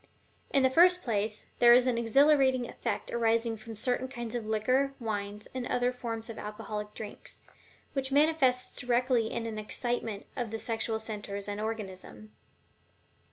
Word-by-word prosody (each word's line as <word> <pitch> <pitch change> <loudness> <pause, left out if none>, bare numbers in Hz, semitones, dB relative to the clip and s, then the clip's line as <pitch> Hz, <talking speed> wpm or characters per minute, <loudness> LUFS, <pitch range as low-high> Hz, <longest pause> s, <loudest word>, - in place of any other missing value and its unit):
In 275 - +3
the 260 - +4
first 360 +4 +6
place, 215 -2 -1
there 240 0 +8
is 250 0 +5
an 250 -2 +2
exhilarating 260 +1 +4
effect - - -4
arising 230 0 +2
from 225 +1 -9
certain 250 +3 0
kinds 240 -3 -6
of 235 -3 -3
liquor, 255 +6 +1
wines, 210 -2 -4
and 255 -1 -3
other 245 0 +1
forms 230 -2 -5
of 230 - -7
alcoholic 210 0 -6
drinks, 210 -2 -7 0.5
which 270 -2 -2
manifests 275 -4 +3
directly 245 -2 +1
in 230 - -3
an 220 -1 -4
excitement 225 -1 -3
of 240 -3 -2
the 225 - -3
sexual 225 0 -2
centers 210 -2 -5
and 205 +1 -3
organism. 215 -1 -6
230 Hz, 155 wpm, -30 LUFS, 215-255 Hz, 0.5 s, there